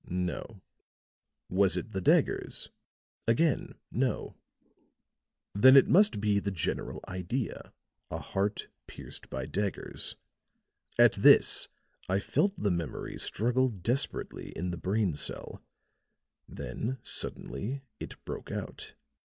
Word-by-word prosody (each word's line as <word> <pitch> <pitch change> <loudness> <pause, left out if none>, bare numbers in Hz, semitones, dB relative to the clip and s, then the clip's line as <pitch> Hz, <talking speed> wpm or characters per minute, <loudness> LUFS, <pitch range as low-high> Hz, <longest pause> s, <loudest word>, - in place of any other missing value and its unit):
No. 90 +3 -3 0.8
Was 95 +1 +3
it 110 - -4
the 95 - -3
daggers? - - +2 0.6
Again, 135 +6 +2 0.2
no. - - -1 1.2
Then 130 +7 +8
it 135 - +7
must 200 - +5
be 100 -1 +2
the 100 - -2
general 90 -6 -3
idea 95 +7 -4 0.4
a - - -3
heart 100 +2 -2 0.2
pierced - - -7
by 65 -1 -4
daggers. 100 +5 -2 0.8
At - - +7
this - - +6 0.4
I 95 - +3
felt 195 - +1
the 100 - +1
memory 85 -3 -4
struggle 125 +4 +1
desperately 115 +5 -2
in 90 +1 -2
the 85 - -4
brain 95 +1 0
cell; 75 - -3 0.9
then 130 +4 -4
suddenly 135 +6 -2 0.2
it - - -9
broke - - -6
out. - - -6
100 Hz, 110 wpm, -30 LUFS, 90-125 Hz, 1.2 s, Then